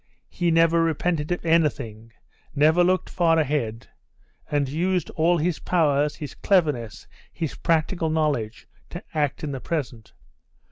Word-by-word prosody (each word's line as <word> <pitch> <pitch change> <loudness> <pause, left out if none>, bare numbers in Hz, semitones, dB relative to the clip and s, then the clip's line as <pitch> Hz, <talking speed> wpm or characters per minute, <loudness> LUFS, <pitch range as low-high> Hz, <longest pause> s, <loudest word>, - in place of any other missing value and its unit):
He 175 -2 -1
never 165 0 +4
repented 165 0 -1
of 175 - -2
anything, 120 -9 0 0.4
never 155 +5 +4
looked 185 +1 +1
far 165 -2 +2
ahead, 135 -7 -1 0.6
and 145 -2 0
used 180 +6 -1
all 170 +2 +2
his 170 +1 -1
powers, 150 -4 +1
his 150 -3 -7
cleverness, 150 - 0 0.3
his 160 -4 -4
practical 165 0 0
knowledge 150 -9 -1 0.2
to 175 - -8
act 150 -2 -1
in 150 - -3
the 135 -2 -5
present. 125 -9 -4
155 Hz, 135 wpm, -24 LUFS, 140-170 Hz, 0.6 s, never